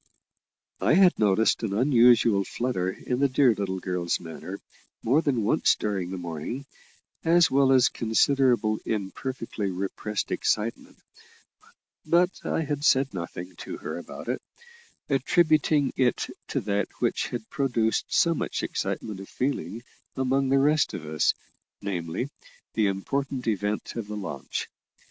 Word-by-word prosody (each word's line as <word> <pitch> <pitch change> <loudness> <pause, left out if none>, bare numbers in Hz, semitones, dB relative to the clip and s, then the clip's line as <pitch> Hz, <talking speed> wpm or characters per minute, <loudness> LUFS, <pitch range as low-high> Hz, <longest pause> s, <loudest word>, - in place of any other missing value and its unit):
I - - +3
had 185 -1 +5
noticed 105 +1 +3
an 110 -4 -2
unusual 120 -3 +5
flutter 110 -5 -2
in 125 +6 -3
the 140 0 +3
dear 130 -2 +4
little 95 -2 -3
girl's 90 -2 -1
manner 90 +3 -8 0.4
more 135 +7 +3
than 130 -8 0
once - - +3
during 95 -4 -2
the 95 - -4
morning, 85 - -5 0.6
as 170 +1 +4
well 135 0 +4
as 130 -2 +6
considerable 120 -1 +2
imperfectly 110 +1 -3
repressed 100 +2 -3
excitement; 110 +2 -1 1.1
but 175 +3 +3
I - - -1
had 145 -2 -3
said 135 -3 +3
nothing 90 0 -6
to - - -6
her - - -5
about - - -9
it, - - -2 0.7
attributing 150 0 +2
it 125 -3 +1 0.2
to - - -1
that 100 0 0
which - - 0
had 120 -3 -5
produced 115 -5 +1
so 170 - +3
much - - -3
excitement 105 -3 -3
of 95 - -10
feeling 120 - -3 0.3
among 130 +1 +1
the 135 - +4
rest 150 +2 +3
of 80 - -7
us, 75 0 +1 0.4
namely, 95 - -3 0.4
the 110 -2 +2
important 130 +7 -2
event 105 -1 -2
of 115 -3 -4
the 105 0 -5
launch. 70 -9 -4
115 Hz, 140 wpm, -26 LUFS, 100-135 Hz, 1.1 s, as